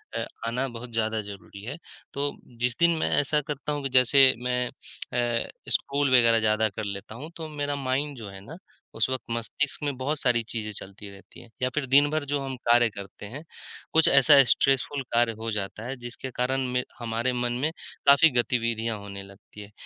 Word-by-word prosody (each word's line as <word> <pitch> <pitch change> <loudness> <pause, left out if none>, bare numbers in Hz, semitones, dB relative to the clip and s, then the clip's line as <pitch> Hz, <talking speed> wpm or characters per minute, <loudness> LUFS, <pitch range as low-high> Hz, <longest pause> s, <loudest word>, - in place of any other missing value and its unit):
अ, - - -1 0.2
आना 125 +3 -1
बहुत 120 0 -8
ज़्यादा 110 -1 0
ज़रूरी 100 0 -11
है। 130 +7 -6 0.4
तो 140 +1 -1 0.3
जिस 125 0 +1
दिन 170 -1 +4
मैं - - 0
ऐसा 150 +1 +1
करता 150 +1 -5
हूँ 145 -1 -3
कि 135 - -2
जैसे 130 +1 +6
मैं 125 0 0
अ, 120 -2 -3 0.2
स्क्रॉल 140 0 +1
वगैरह 115 -1 +5
ज़्यादा 110 0 +2
कर 105 +2 -6
लेता 100 +1 -6
हूँ, 145 +7 -8
तो 160 -1 -6
मेरा 145 -1 -2
माइंड 140 +2 -1
जो 110 -4 -8
है 95 0 -10
ना 160 +8 -9 0.4
उस 110 +3 +1
वक़्त 130 -1 -2
मस्तिष्क 125 +6 -2
में 145 -2 -1
बहुत 140 +4 -1
सारी 120 -2 +2
चीज़ें 110 -2 -3
चलती 100 +1 -11
रहती 100 0 -15
हैं। 120 - -16
या 130 - +2
फिर 150 -3 0
दिन 145 +2 +6
भर 155 -1 -1
जो 145 0 -1
हम 135 -1 -4
कार्य 120 0 +5
करते 100 0 -10
हैं, 130 +9 -8 0.5
कुछ 160 0 +5
ऐसा 140 +1 +7
स्ट्रेसफुल 135 +2 +2
कार्य 120 -1 +3
हो 115 0 -3
जाता 105 +1 -4
है 130 - -4
जिसके 120 +2 -7
कारण 130 +2 0
में 125 0 +1 0.2
हमारे 120 +1 -1
मन 120 -1 -1
में 150 - +2 0.4
काफ़ी 140 +4 +8
गतिविधियाँ 115 -2 0
होने 100 -1 -8
लगती 100 +2 -14
हैं, 100 0 -11
125 Hz, 200 wpm, -26 LUFS, 110-140 Hz, 0.5 s, काफ़ी